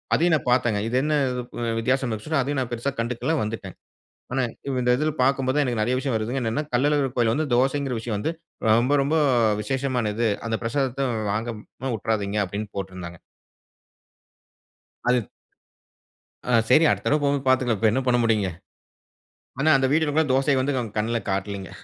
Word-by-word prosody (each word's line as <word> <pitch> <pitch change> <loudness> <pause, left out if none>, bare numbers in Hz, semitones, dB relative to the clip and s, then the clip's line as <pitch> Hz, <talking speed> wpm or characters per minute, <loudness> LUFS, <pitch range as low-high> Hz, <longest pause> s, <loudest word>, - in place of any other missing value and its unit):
அதையும் 175 +1 +3
நான் 135 - -3
பார்த்தேங்க. 120 -4 +2
"இது 120 - -2
என்ன 155 - 0 0.4
புது 120 -1 -3
வித்தியாசம்" 130 +2 0
இருந்துச்சுனா, 135 +7 -1
அதையும் 140 0 -2
நான் 125 - -3
பெருசா 120 +4 -2
கண்டுக்கல, 120 +7 -1
வந்துட்டேன். 105 -4 -6 0.6
ஆனா 130 0 +1 0.4
இந்த 125 - +1
இதுல 155 +3 0
பார்க்கும் 135 0 +2
போதான் 145 +3 +2
எனக்கு 120 -4 -1
நறைய 120 +4 +1
விஷயம் 135 -2 -2
வருதுங்க. 120 +5 -2
என்னன்னா 115 +6 -1
கள்ளழகர் 140 0 +2
கோயில்ல 115 -2 +3
வந்து 155 +1 0
தோசைங்கிற 135 +1 +1
விஷயம் 110 -2 -3
வந்து, 160 +10 -1 0.4
ரொம்ப 120 +6 +4
ரொம்ப 140 +3 0 0.5
விசேஷமானது. 120 -3 -1 0.2
அந்த 115 -1 -1
"பிரசாதத்த 135 +2 -1 0.2
வாங்காம 115 +4 -5
வுட்றாதீங்க" 105 -1 -1
அப்டின்னு 100 +3 -5
போட்டுருந்தாங்க. 90 -3 -6 1.9
அது 125 -4 +1 1.2
ஆ - - +2 0.2
சரி 155 +6 +6
அடுத்த - - -1
தடவ 150 - +3
போகும் 140 - +3
போது 135 - -12
பாத்துக்கலாம். 125 -5 +2
இப்ப 110 - +3
என்ன 130 - +1
பண்ண 125 -1 +4
முடியும்ங்க. 105 -4 +2 1.1
ஆனா 155 - +3
அந்த 135 -1 +2
வீடியோலலாம் 155 -2 +2
தோசைய 135 0 +2
வந்து 140 +1 0 0.2
கண்ணுல 115 +2 0
காட்லைங்க. 100 0 -3
125 Hz, 155 wpm, -24 LUFS, 110-135 Hz, 1.9 s, சரி